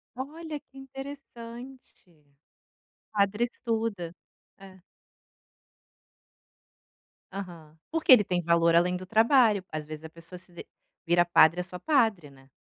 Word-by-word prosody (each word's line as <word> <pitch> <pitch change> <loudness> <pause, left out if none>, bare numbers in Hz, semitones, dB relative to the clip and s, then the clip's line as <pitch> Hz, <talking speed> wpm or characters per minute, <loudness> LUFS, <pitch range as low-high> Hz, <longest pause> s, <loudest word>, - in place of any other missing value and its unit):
Olha, 300 +3 -6
que 270 - -21
interessante! 270 -4 -11
O 145 -3 -31 0.8
padre 205 +2 +1
estuda. 225 -8 -3 0.4
É. 190 -1 -15 2.5
Aham. 170 -5 -9
Porque 325 -4 +2
ele 230 -5 +9
tem 180 -1 -1
valor 170 0 +3
além 180 +1 +3
do 185 +1 -6
trabalho. 220 -1 +4
Às 155 -1 -5
vezes, 155 0 -9
a 160 - -8
pessoa 165 +2 -11
se 180 0 -13
de 170 - -10 0.4
vira 175 +1 +3
padre, 170 0 +5
é - - -1
só 180 0 -7
padre, 220 - +1
né? 135 0 -20
190 Hz, 130 wpm, -27 LUFS, 170-240 Hz, 2.5 s, ele